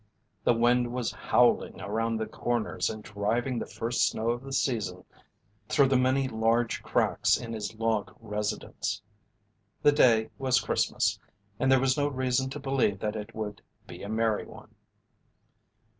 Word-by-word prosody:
The 120 - +4
wind 120 +1 +3
was 125 -2 -2
howling - - +2
around 115 +2 -1
the 110 - -2
corners 120 -2 -1
and 110 -1 -6
driving 115 +4 -1
the - - -5
first 115 -1 0
snow 115 +1 -1
of 120 +1 -3
the 135 0 -9
season 110 -9 -1 0.7
through 140 -3 +4
the 135 - +3
many 130 +1 +2
large 115 0 +1
cracks - - +2
in 115 -1 -6
his 110 0 -4
log 110 -2 0
residence. 105 -1 -3 0.8
The 145 - +7
day 115 -6 +4
was 130 -1 +3
Christmas, 110 - 0 0.4
and 130 - +2
there 135 - +6
was 130 +1 +2
no 145 - +2
reason 130 -1 0
to 145 - -6
believe 135 -7 +1
that 105 +2 -3
it 105 -1 -7
would 105 -2 -5 0.2
be - - -10
a 100 - -6
merry 110 -1 0
one. - - -14
115 Hz, 160 wpm, -28 LUFS, 110-130 Hz, 0.8 s, The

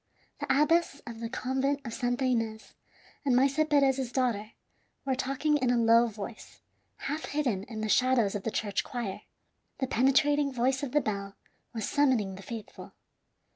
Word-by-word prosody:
The - - -4
abbess 300 +1 +3
of 230 -1 -8
the 230 0 -4
Convent 265 +2 -1
of 230 - -5
Santa 245 +1 -1
Ines 225 -3 -1 0.5
and 265 -4 +2
Maese 275 +4 +3
Perez's 270 -3 +2
daughter 230 -5 -1 0.5
were 270 - +1
talking 275 +3 0
in 255 -3 0
a 245 - +3
low 230 +1 +5
voice, 215 0 -9 0.4
half 300 +3 -4
hidden 245 -10 -1
in 220 -2 -6
the 215 - -1
shadows 245 -3 +3
of 205 - -3
the 225 - -2
church 205 -2 -1
choir. 210 -5 -5 0.6
The 265 - 0
penetrating 280 +3 +3
voice 260 +1 +1
of 280 -4 -3
the 295 - +4
bell 200 -3 -4 0.4
was 225 -3 -3
summoning 255 -9 +2
the 190 - -9
faithful. 220 0 -9
250 Hz, 165 wpm, -29 LUFS, 225-275 Hz, 0.6 s, low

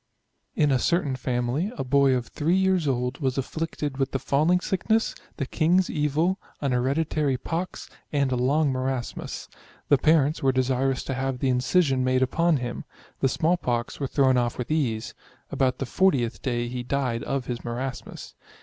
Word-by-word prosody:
In 150 -2 +3
a 130 - +3
certain 150 -2 +1
family, 125 - -1
a - - -1
boy 135 0 +3
of 125 -1 -2
3 160 +8 0
years 190 -4 +2
old, 125 0 -1
was 135 -3 -1
afflicted 145 0 -3
with 135 0 0
the - - +2
falling 155 +7 +2
sick 190 +2 -3
ness, 220 +1 +3 0.2
the 140 - -1
king's 175 +7 +2
evil, 155 +5 +1 0.2
an 140 -2 -1
hereditary 140 +2 +1
pox, 170 +6 -4 0.2
and 140 -3 +1
a - - +1
long 140 +4 +2
marasmus. 130 -1 -3 0.4
The 145 - +5
parents 155 0 +3
were 135 - +3
desirous 130 0 0
to 135 - -3
have 135 0 -2
the 130 +1 0
incision 130 +1 +2
made 130 0 +2
upon 165 +5 +2
him; 120 -2 -4 0.4
the 135 - +2
small 165 +6 +1
pox 120 -6 -2
were 140 - -1
thrown 130 -2 +3
off 120 -1 0
with 125 +3 -4
ease; 120 -8 -1 0.4
about 130 -2 +1
the 135 - -3
40th 120 - +1
day 120 -2 -1
he 125 +1 -4
died 125 -2 -1
of 135 -2 -2
his 120 -1 -4
marasmus. 125 +2 -5
135 Hz, 175 wpm, -25 LUFS, 125-155 Hz, 0.4 s, The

